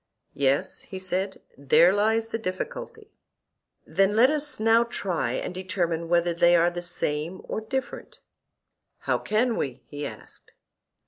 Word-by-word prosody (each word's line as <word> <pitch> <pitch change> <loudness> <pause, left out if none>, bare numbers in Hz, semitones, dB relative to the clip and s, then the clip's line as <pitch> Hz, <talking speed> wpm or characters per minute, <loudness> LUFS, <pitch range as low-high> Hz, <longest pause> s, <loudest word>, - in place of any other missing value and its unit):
Yes, 140 0 0
he 190 - -8
said; 185 +1 -2 0.2
there 165 +6 +5
lies 220 +2 +1
the 225 - -3
difficulty. 440 - -6 0.7
Then 195 +1 +2
let 250 +5 +6
us 300 -3 -1
now 225 +1 +5
try 180 - -2
and - - -3
determine 175 -3 -2
whether 175 0 +2
they 175 +1 +4
are 170 +1 +4
the 175 0 -5
same 170 0 -3
or - - -4
different. 260 +5 -5 0.8
How - - 0
can 225 +3 +1
we? 130 -2 -4
he 145 0 -5
asked. - - -13
185 Hz, 140 wpm, -26 LUFS, 170-225 Hz, 0.8 s, let